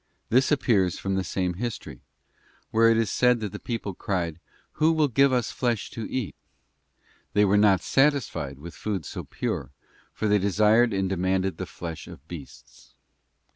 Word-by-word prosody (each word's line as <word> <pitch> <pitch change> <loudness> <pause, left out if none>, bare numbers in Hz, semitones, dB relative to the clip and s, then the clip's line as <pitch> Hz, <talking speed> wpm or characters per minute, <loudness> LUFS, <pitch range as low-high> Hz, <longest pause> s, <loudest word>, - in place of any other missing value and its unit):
This 130 +5 +3
appears 105 - +2
from 95 - -2
the 95 0 0
same 90 -1 -1
history, 95 - -5 0.7
where 115 +1 +5
it 115 - +4
is 115 -3 +1
said 125 -1 +3
that 105 -3 -3
the - - -7
people 115 -5 -4
cried, 85 -3 -3 0.3
'Who 155 +2 +2
will 155 -2 +3
give 135 +2 +4
us 125 -4 0
flesh 120 -4 -1
to 115 - -6
eat?'{ 130 -7 -3 1.0
They 105 0 +4
were 100 +1 +3
not 105 -2 +5
satisfied 135 - +1
with 80 +4 -10
food 95 -1 -4
so - - -6
pure, - - -4 0.4
for 110 - -2
they 105 0 +4
desired 105 +4 +3
and 95 -1 0
demanded 95 -1 0
the - - -5
flesh 85 -2 -7
of 70 - -13
beasts. 80 -6 -12
105 Hz, 170 wpm, -26 LUFS, 95-120 Hz, 1.0 s, where